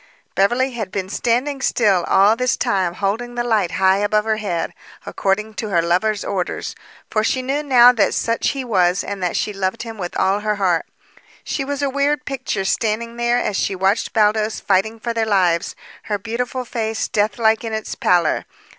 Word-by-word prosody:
Beverly 240 +7 +2
had 220 -6 -5
been 190 -1 -3
standing 255 +6 -1
still 200 -9 +2
all 200 +3 +4
this 250 +1 0
time 185 -3 0
holding 225 +5 -2
the 240 - -1
light 210 -8 +1
high 190 0 +3
above 210 +1 +1
her 220 -1 +1
head, 190 -6 -3 0.3
according 210 +3 -1
to 215 0 -4
her 175 -4 +2
lover's 195 +5 0
orders, 190 -3 -3 0.4
for 215 - +1
she 255 +3 0
knew 275 +3 -1
now 250 -4 +7
that 230 -5 +1
such 230 0 0
he 270 -2 -3
was 185 -5 +2
and 200 -1 -5
that 180 -1 -1
she 210 - -1
loved 190 0 -2
him 225 -2 -8
with 175 -2 -4
all 195 +2 +2
her 210 0 -1
heart. 185 -5 0 0.6
She 275 - -2
was 285 +1 -3
a - - +2
weird 285 +2 0
picture 260 -8 -3
standing 230 +3 -1
there 240 0 +1
as 210 -4 -1
she 195 - 0
watched 190 +4 +1
Baldos 215 0 +1
fighting 205 +3 0
for 235 +1 -3
their 225 -1 0
lives, 180 -4 +1 0.3
her 210 -2 -1
beautiful 245 +4 -4
face 225 -2 -2
deathlike 220 +2 +1
in 225 - -4
its 220 0 -4
pallor. 175 -1 +1
215 Hz, 190 wpm, -20 LUFS, 195-240 Hz, 0.6 s, now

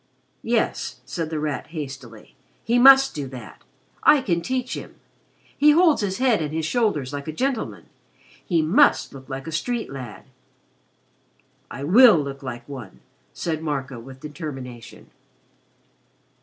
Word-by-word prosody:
"Yes," - - -1
said 165 -3 -4
The 160 -1 -3
Rat 150 -2 -3
hastily. 135 -8 -9 0.3
"He 240 +1 +2
must 270 +1 +8
do 145 -3 -5
that. 130 -1 -11 0.4
I 295 - +6
can 170 -7 0
teach 255 +7 -3
him. - - -8 0.6
He 295 +1 +5
holds 330 -4 +4
his 190 -2 -2
head 245 -6 +2
and 150 -1 -3
his 160 0 -2
shoulders 160 - 0
like 140 +1 -6
a - - -2
gentleman. 255 - -3 0.6
He 165 -4 +1
must 230 - +3
look 135 -1 -12
like 135 0 -6
a 160 - -6
street 225 - -3
lad." 130 -5 -8 1.5
"I 135 - -7
will 220 - +7
look 140 -2 -4
like 120 -3 -7
one," 130 -9 -10 0.3
said 160 -2 -3
Marco, 135 -5 -4
with 130 +3 -12
determination. 135 -6 -9
155 Hz, 140 wpm, -23 LUFS, 135-225 Hz, 1.5 s, must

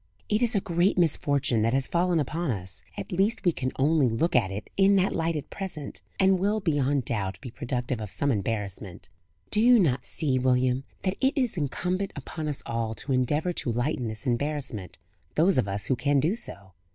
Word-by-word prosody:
"It 210 +2 +2
is 240 -1 +3
a - - +4
great 180 0 +1
misfortune 140 -7 +2
that 115 +3 +2
has 135 -1 +1
fallen 175 -1 +1
upon 155 +3 -2
us 95 -4 -2 0.2
at 100 - -6
least 200 +5 +1
we 175 - +5
can 130 -4 -3
only 145 0 +3
look 145 +10 0
at 115 -6 +4
it 100 +2 -6
in 195 +1 +5
that 190 0 +2
light 165 0 0
at 145 -2 -5
present, 175 -7 -5 0.2
and 190 -1 +4
will, 205 +3 +1
beyond 145 - +1
doubt, 95 -5 -2
be 125 - -8
productive 125 -2 -3
of 105 - -5
some 140 +7 0
embarrassment. 100 -5 -4 0.4
Do 210 - +2
you 245 +1 +7
not 135 - +1
see, 135 -5 0
William, 130 +1 +2 0.2
that 190 0 -1
it 270 +3 +2
is 250 -6 0
incumbent 180 +5 -2
upon 155 +2 -5
us 145 -2 -3
all 115 -1 -2
to 135 +5 -3
endeavour 145 +7 +1
to 120 - -1
lighten 120 +1 -1
this 110 +3 -5
embarrassment, 130 -5 -2 0.4
those 170 -1 +4
of 100 - 0
us 100 0 -2
who 130 - +1
can 140 +2 +2
do 160 +9 +1
so? 100 - -5
140 Hz, 200 wpm, -27 LUFS, 120-175 Hz, 0.4 s, you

